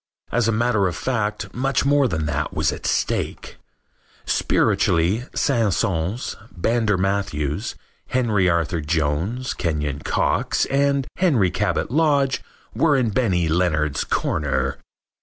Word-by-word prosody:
As 120 Hz, -1 st, +2 dB
a -, -, +3 dB
matter 110 Hz, -3 st, +2 dB
of 90 Hz, -, -3 dB
fact 110 Hz, -5 st, -2 dB
much 135 Hz, +2 st, 0 dB
more 140 Hz, -1 st, +4 dB
than 80 Hz, -8 st, -2 dB
that 75 Hz, -2 st, -2 dB
was -, -, +1 dB
at -, -, -5 dB
stake. -, -, -2 dB, 0.7 s
Spiritually, 90 Hz, +9 st, +2 dB
Saint 115 Hz, -8 st, +2 dB
Saens, 95 Hz, +2 st, -1 dB, 0.2 s
Brander 110 Hz, +2 st, +1 dB
Matthews, 95 Hz, -7 st, -1 dB, 0.3 s
Henry 110 Hz, -7 st, +2 dB
Arthur 85 Hz, -1 st, 0 dB
Jones, 80 Hz, -, -1 dB
Kenyon 75 Hz, -4 st, -2 dB
Cox, -, -, 0 dB
and 140 Hz, 0 st, +2 dB
Henry 130 Hz, -, +3 dB
Cabot -, -, -1 dB
Lodge 140 Hz, -3 st, +2 dB, 0.3 s
were 150 Hz, -4 st, +3 dB
in 120 Hz, -4 st, +1 dB
Benny 95 Hz, -7 st, +1 dB
Leonard's 80 Hz, -3 st, +1 dB
corner. 70 Hz, -2 st, -1 dB
100 Hz, 120 wpm, -22 LUFS, 80-125 Hz, 0.7 s, more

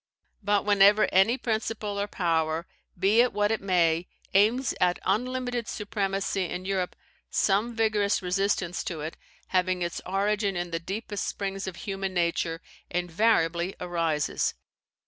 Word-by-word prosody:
But 205 Hz, 0 st, +1 dB
whenever 205 Hz, +1 st, +6 dB
any 195 Hz, +7 st, +4 dB
principle 220 Hz, -3 st, -2 dB
or 200 Hz, -, -1 dB
power, 165 Hz, -3 st, 0 dB, 0.3 s
be 200 Hz, +6 st, +4 dB
it 245 Hz, -, +2 dB
what 205 Hz, +1 st, +1 dB
it 225 Hz, -, 0 dB
may, 175 Hz, -3 st, +2 dB, 0.3 s
aims 220 Hz, +6 st, +3 dB
at 180 Hz, -1 st, +3 dB
unlimited 245 Hz, +3 st, -1 dB
supremacy 195 Hz, -2 st, -1 dB
in 180 Hz, +2 st, -5 dB
Europe, 190 Hz, -2 st, -1 dB, 0.3 s
some 215 Hz, +4 st, +1 dB
vigorous 215 Hz, -2 st, +2 dB
resistance 185 Hz, -1 st, 0 dB
to 165 Hz, -4 st, -4 dB
it, 155 Hz, +2 st, -5 dB, 0.3 s
having 185 Hz, -1 st, +1 dB
its 170 Hz, -, -3 dB
origin 200 Hz, +1 st, 0 dB
in 175 Hz, 0 st, -3 dB
the 165 Hz, -, -1 dB
deepest 200 Hz, +3 st, -4 dB
springs 195 Hz, -1 st, -3 dB
of 185 Hz, -, -5 dB
human 195 Hz, 0 st, -4 dB
nature, 170 Hz, -1 st, 0 dB, 0.3 s
invariably 175 Hz, -1 st, +1 dB
arises. 165 Hz, -4 st, 0 dB
195 Hz, 135 wpm, -27 LUFS, 175-210 Hz, 0.3 s, whenever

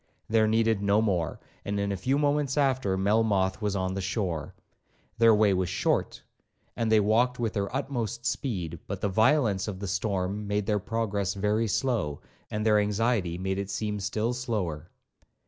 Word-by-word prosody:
There 110 Hz, 0 st, +3 dB
needed 110 Hz, -1 st, +2 dB
no 100 Hz, +1 st, +3 dB
more; 90 Hz, -8 st, 0 dB, 0.2 s
and 100 Hz, 0 st, -2 dB
in 100 Hz, 0 st, -1 dB
a -, -, -1 dB
few 130 Hz, +9 st, 0 dB
moments 145 Hz, -1 st, +1 dB
after, 130 Hz, -9 st, +1 dB
Melmoth 100 Hz, -1 st, +1 dB
was 105 Hz, -1 st, -1 dB
on 95 Hz, -1 st, -1 dB
the 95 Hz, -, -3 dB
shore. 95 Hz, -5 st, -3 dB, 0.6 s
Their 115 Hz, -1 st, +7 dB
way 105 Hz, -2 st, +4 dB
was 95 Hz, -1 st, 0 dB
short, 90 Hz, -4 st, -1 dB, 0.5 s
and 115 Hz, -1 st, -1 dB
they 110 Hz, -, +6 dB
walked 115 Hz, +5 st, +2 dB
with 115 Hz, -3 st, -1 dB
their 100 Hz, -2 st, -2 dB
utmost 120 Hz, -4 st, -3 dB
speed; 100 Hz, -, -2 dB
but 100 Hz, -1 st, -4 dB
the 100 Hz, -, 0 dB
violence 110 Hz, -1 st, +2 dB
of 100 Hz, -3 st, -4 dB
the 100 Hz, -, -4 dB
storm 95 Hz, +1 st, -2 dB
made 105 Hz, 0 st, 0 dB
their 105 Hz, 0 st, +1 dB
progress 100 Hz, -2 st, -2 dB
very 105 Hz, +3 st, +1 dB
slow, 105 Hz, -, -1 dB, 0.3 s
and 105 Hz, 0 st, -3 dB
their 105 Hz, -1 st, +5 dB
anxiety 105 Hz, -4 st, 0 dB
made 95 Hz, +1 st, -2 dB
it 100 Hz, 0 st, -4 dB
seem 105 Hz, 0 st, -2 dB
still 105 Hz, +4 st, -1 dB
slower. 95 Hz, -, -3 dB
105 Hz, 175 wpm, -28 LUFS, 95-115 Hz, 0.6 s, Their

